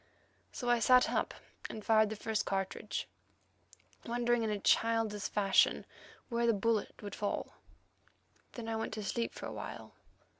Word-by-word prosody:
So 245 - -5
I 240 -1 +4
sat 250 +2 +5
up - - 0 0.4
and 215 - -7
fired 220 -1 +5
the 220 - -4
first 220 0 -1
cartridge, 195 -1 -3 1.0
wondering 240 0 +1
in 220 - 0
a 210 - 0
childish 225 0 +2
fashion 195 -2 +3 0.4
where 235 -1 0
the 230 - +5
bullet 220 +1 -1
would 205 -1 -6
fall. 205 - -3 1.0
Then 235 -2 -6
I 225 0 -1
went 220 - -3
to 215 - -4
sleep 230 +4 -1
for - - -8
awhile. - - -7
225 Hz, 150 wpm, -33 LUFS, 210-235 Hz, 1.0 s, sat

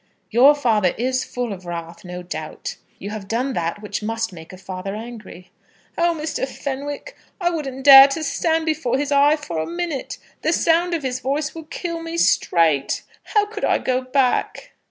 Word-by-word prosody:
"Your 265 +6 +7
father 220 -10 +2
is 255 +2 0
full 245 -4 -4
of 185 -2 -10
wrath, 170 0 -6
no 180 0 -7
doubt. 160 -3 -6 0.2
You 200 - -7
have 210 -2 -6
done 250 +5 -1
that 170 +3 -3
which 205 0 -4
must 225 -1 -2
make 160 -1 -11
a 185 - -10
father 190 +1 -6
angry." 215 -5 -10 0.4
"Oh, 340 -1 +1
Mr. 300 -3 -2
Fenwick, 285 - -5 0.2
I 350 -2 +1
wouldn't 270 -5 -4
dare 270 -1 +11
to 295 +3 -3
stand 320 +1 0
before 260 -6 0
his 290 +1 -2
eye 285 +2 +5
for 175 - -5
a 160 - -2
minute. 340 -5 -4 0.2
The 320 - +1
sound 340 +1 +2
of 315 - -4
his 255 -1 -2
voice 285 +4 -2
would 320 -2 -10
kill 335 -2 -4
me 330 0 -5
straight. 160 - +2 0.2
How 420 -2 +2
could 420 0 -8
I - - +3
go 255 0 0
back?" 260 - 0
260 Hz, 185 wpm, -21 LUFS, 205-310 Hz, 0.4 s, dare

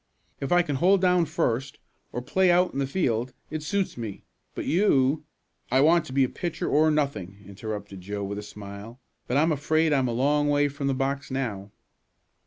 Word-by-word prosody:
If 135 - -4
I 175 0 +5
can 145 -5 -2
hold 190 +7 +4
down 180 -2 +3
first, 130 -1 -1 0.3
or 125 - -4
play 185 +7 +2
out 180 +1 +3
in 135 - -3
the 135 - 0
field, 125 -6 -1 0.2
it 155 0 -3
suits 190 +3 -1
me; 110 -4 -6 0.3
but - - -4
you 150 -5 +2 0.2
" - - -37
"I 130 +1 +4
want 165 +3 +4
to - - -9
be 135 -1 +3
pitcher 170 +5 -4
or 155 +2 +4
nothing," 105 - -2
interrupted 100 -1 -7
Joe 100 +2 -4
with 100 +1 -4
a - - -5
smile, 105 +3 -10 0.3
"but 125 - +1
I'm 160 +3 +3
afraid 155 +2 +2
I'm 135 -3 +2
a - - -1
long 145 +4 +2
way 145 0 +3
from 140 0 -4
the 135 - +1
box 135 +1 -2
now." 115 -7 -3
135 Hz, 195 wpm, -26 LUFS, 115-155 Hz, 0.3 s, I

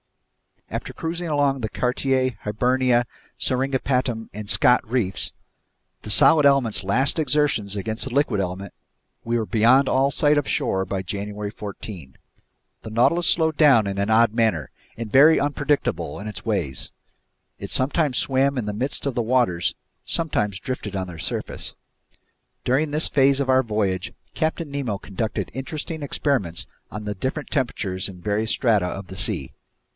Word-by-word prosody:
After - - -4
cruising 170 +1 -4
along 145 -3 +1
the 110 - -2
Cartier, 130 +1 0
Hibernia, 125 +3 +2 0.3
Seringapatam, 130 -3 0
and 105 -1 -7
Scott 125 -1 +3
reefs, 110 -7 0 0.7
the - - -9
solid 150 +7 +6
element's 135 -7 +3
last 130 - +2
exertions 140 -9 +1
against 110 +3 -3
the - - -4
liquid 135 -7 +1
element, 95 +1 -4 0.5
we 120 +1 0
were 110 - -1
beyond 120 +5 +4
all 135 +1 +3
sight 145 +1 +3
of 145 - -4
shore 95 -10 0
by 95 -1 -3
January 100 +2 -5
14. 100 -8 -8 0.7
The - - -7
Nautilus 125 +10 +3
slowed 160 -2 +2
down 135 -9 +6
in 100 -1 -3
an 100 +2 0
odd 110 0 +4
manner, 110 - 0 0.3
and 115 -2 -6
very 150 +6 +7
unpredictable 140 - -1
in 105 - -7
its 95 -2 -7
ways, 85 - -2 0.7
it - - -6
sometimes 140 0 +1
swam 135 +1 +1
in 120 - -1
the 105 - -3
midst 125 +7 -2
of 140 - -1
the 120 - 0
waters, 115 -7 +1 0.3
sometimes 105 - 0
drifted 105 -2 -5
on 95 -1 -2
their 85 -2 -9
surface. - - -4 0.9
During 140 +5 +1
this 150 +2 +1
phase 135 0 +3
of 135 - -2
our 130 0 +5
voyage, 100 -6 -2 0.2
Captain 160 -1 -2
Nemo 130 -8 -2
conducted 105 +3 -4
interesting 155 +4 -5
experiments 130 - -1 0.2
on 105 +1 -7
the 105 0 -3
different 130 +9 -4
temperatures 100 -9 -1
in 90 -3 -11
various 105 +3 0
strata 105 -7 +2
of 95 +1 -6
the 95 - -9
sea. 95 - -2
120 Hz, 155 wpm, -23 LUFS, 100-140 Hz, 0.9 s, very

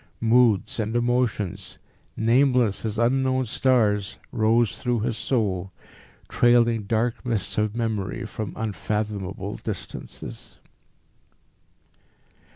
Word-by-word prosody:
Moods 115 -2 +3
and 110 +1 -1
emotions, 120 -5 -1 0.4
nameless 120 -2 +3
as 110 0 -3
unknown 130 +2 +2
stars, 105 -5 +1
rose 115 -1 +2
through 120 -3 -1
his 115 0 -1
soul, 100 -7 -1 0.6
trailing 120 -3 +3
dark 115 +3 0
mists 115 -5 -2
of 105 0 0
memory 110 -1 -2
from 110 -1 -5
unfathomable 105 -2 -3
distances. 105 -5 -8
115 Hz, 90 wpm, -24 LUFS, 105-120 Hz, 0.6 s, Moods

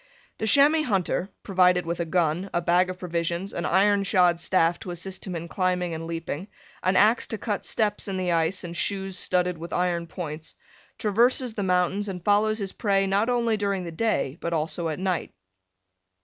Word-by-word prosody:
The 220 - -1
chamois 285 +7 +5
hunter, 195 -2 0
provided 180 -2 +3
with 170 +1 -3
a 170 - 0
gun, 170 +2 0
a - - +3
bag 175 +2 +2
of 185 - -5
provisions, 175 +2 -3
an 170 - -2
iron 200 +2 +3
shod 180 -4 +3
staff 170 -1 +2
to - - -8
assist 185 +3 -4
him 180 - -4
in 170 0 -5
climbing 180 -1 -1
and 165 0 -5
leaping, 165 +1 -5 0.3
an 185 +1 +1
ax 215 +5 +4
to 220 - -3
cut 210 -1 -3
steps 210 -2 -1
in 195 -1 -3
the 180 -1 -1
ice 165 +2 0
and 170 -1 -6
shoes 195 +1 -1
studded 180 -2 +1
with 170 +1 -8
iron 175 -1 0
points, 160 -2 -6 0.4
traverses 235 +3 +2
the 215 - -3
mountains 190 +2 +1
and 180 -2 -7
follows 215 +1 +3
his 200 -3 -5
prey 195 -3 +1
not 200 +4 +1
only 235 -3 +1
during 200 -2 -1
the 170 - -6
day, 165 -6 -1
but 170 - -2
also 160 +1 -2
at 155 - -3
night. 185 - -2
185 Hz, 190 wpm, -25 LUFS, 170-200 Hz, 0.4 s, chamois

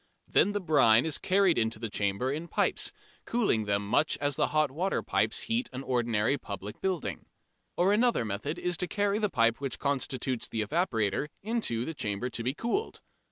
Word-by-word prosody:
Then 205 - +3
the 205 - 0
brine 135 - +4
is 160 -2 0
carried 190 -5 +3
into 110 0 0
the 115 +1 -4
chambers 105 +6 -1
in 165 +3 -5
pipes, - - 0 0.3
cooling 205 - +1
them 100 0 0
much 150 +8 +2
as 145 -1 -1
the - - +2
hot 155 -2 +1
water 180 +7 -1
pipes - - 0
heat 235 +2 -1
an 130 +1 -5
ordinary 120 0 +1
public 100 -1 -7
building. 185 -4 -2 0.5
Or 185 +3 +4
another 230 - +2
method 110 - -3
is 180 -1 -1
to 180 - -2
carry 205 +1 0
the 210 -2 +1
pipe 115 -4 +2
which 135 -2 -3
constitutes 130 -3 -1
the 110 -2 -2
evaporator 115 - 0 0.2
into 210 - -1
the 160 - -4
chamber 110 -1 -3
to 120 - -4
be 130 +4 -1
cooled. 235 - -2
140 Hz, 185 wpm, -29 LUFS, 115-180 Hz, 0.5 s, brine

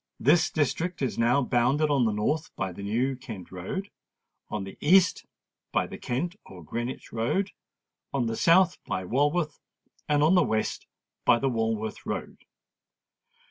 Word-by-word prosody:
This 160 +4 +4
district 160 +2 -1
is 130 - -1
now 120 +4 +3
bounded 130 +6 +2
on 135 -4 +3
the 110 - +2
north 130 +10 -1
by 95 -1 -2
the 90 - -9
New 120 +7 0
Kent 110 -8 -9
Road, 95 - -5 0.6
on 105 -2 -3
the 95 - -8
east 180 +4 +4 0.4
by - - +1
the - - -9
Kent 170 +9 -2
or 90 -2 -12
Greenwich 120 - -5
Road, 155 - 0 0.6
on 135 -3 0
the 115 0 -1
south 175 +6 +4
by 95 - -3
Walworth, 145 - +1 0.5
and 145 0 +3
on 160 +4 +5
the 180 - +6
west 110 -8 -1 0.4
by - - +5
the 135 +3 0
Walworth 110 -2 -2
Road. - - -5
130 Hz, 155 wpm, -27 LUFS, 110-155 Hz, 0.6 s, the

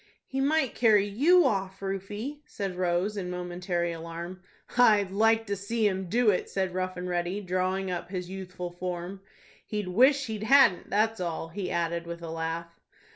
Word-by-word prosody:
"He 270 0 -3
might 290 -1 +2
carry 215 -4 +4
you 300 - +4
off, 195 -5 -1
Rufie," 205 +8 -4
said 195 -9 -4
Rose, 180 +3 0
in 180 -2 -3
momentary 180 -1 -2
alarm. 170 +2 -7 0.3
"I'd 210 -6 +5
like 225 +2 +3
to 200 -1 -2
see 215 +3 -1
him 190 -2 -2
do 230 +1 +4
it," 185 - -2
said 190 -2 -1
Rough 185 0 -2
and 180 0 -4
Ready, 175 +2 -1
drawing 185 0 -1
up 175 0 -4
his 180 -2 -4
youthful 180 -1 -6
form. 180 +1 -5 0.5
"He'd 210 -3 -3
wish 265 +8 +4
he 220 -3 -4
hadn't, 225 -3 +5
that's 220 +2 +1
all," 165 -2 -3
he 185 +2 -4
added, 170 0 -1
with 170 0 -7
a 165 - -5
laugh. 165 +1 -4
190 Hz, 175 wpm, -28 LUFS, 175-215 Hz, 0.5 s, I'd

